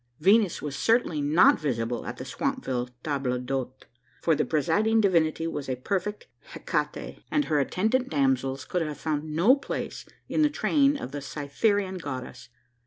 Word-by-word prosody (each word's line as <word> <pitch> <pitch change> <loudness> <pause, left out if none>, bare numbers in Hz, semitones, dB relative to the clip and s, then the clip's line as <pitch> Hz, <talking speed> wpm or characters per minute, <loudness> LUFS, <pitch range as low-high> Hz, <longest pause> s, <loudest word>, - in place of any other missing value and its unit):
Venus 195 +2 +3
was 145 -2 -4
certainly 225 - +2
not 150 +5 +5
visible 120 -5 -2
at 120 - -5
the - - -6
Swampville 130 - -2
table 135 -4 -1
d'hote: 130 +1 -4 0.4
for 165 - +4
the - - +1
presiding 210 +9 +2
divinity 165 -6 +2
was 145 -4 -4
a 130 - 0
perfect 195 +10 -3 0.3
Hecate; - - -3
and 295 -1 +1
her 150 - +1
attendant 220 - 0
damsels 135 -2 0
could 180 - -1
have 150 -3 -3
found 150 0 -3
no 205 - +6
place 280 - -5 0.2
in - - 0
the 300 - +5
train 290 -1 +2
of 130 - -6
the 145 0 -5
Cytherean 185 +8 -1
goddess. 130 -5 -7
155 Hz, 160 wpm, -27 LUFS, 135-205 Hz, 0.4 s, no